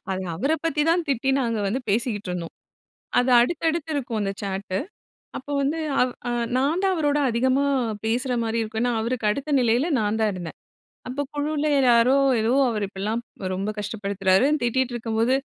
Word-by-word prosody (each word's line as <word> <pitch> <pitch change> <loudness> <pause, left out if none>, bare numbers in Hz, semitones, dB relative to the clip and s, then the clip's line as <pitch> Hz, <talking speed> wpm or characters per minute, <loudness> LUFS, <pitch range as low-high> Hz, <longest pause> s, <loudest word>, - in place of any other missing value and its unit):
அது 190 - -3
அவரப் 280 - -1
பத்தி 300 -2 +1
தான் 345 +1 +2
திட்டி 270 0 +1
நாங்க 230 -3 -1
வந்து 235 +7 -1
பேசிட்டு 210 -2 -1
இருந்தோம். 175 -2 -5 0.7
அது 250 +1 +2
அடுத்தடுத்து 320 +4 0
இருக்கும் 245 -5 -2
அந்த 195 -1 -1
ஷாட்டு. 195 -1 -3 0.6
அப்போ 285 +2 -6
வந்து 290 +4 0 0.2
அவ் 250 0 +2 0.4
நான் 290 +7 +1
தான் 385 -1 +2
அவரோட 295 -2 +1
அதிகமா 260 +4 +2 0.4
பேசுறமாரி 230 -1 0
இருக்கும். 220 +1 -3
ஏன்னா, 245 0 +1
அவருக்கு 230 -1 -1
அடுத்த 280 +7 -3
நிலையில 245 +7 +2
நான் 210 +1 0
தான் 215 - +2
இருந்தேன். 175 -3 -7 0.5
அப்போ 260 +3 -3
குழுவில 300 +1 -1 0.2
யாரோ 235 +3 +5 0.3
ஏதோ 225 +2 +1 0.2
அவர் 215 -3 -2
இப்பிடிலாம் 210 +4 -3 0.3
ரொம்ப 195 +3 -2
கஷ்டப்படுத்துறாரு 200 0 +1 0.2
திட்டிட்டு 250 +1 0
இருக்கும்போது, 230 +2 +1
235 Hz, 155 wpm, -24 LUFS, 210-275 Hz, 0.7 s, யாரோ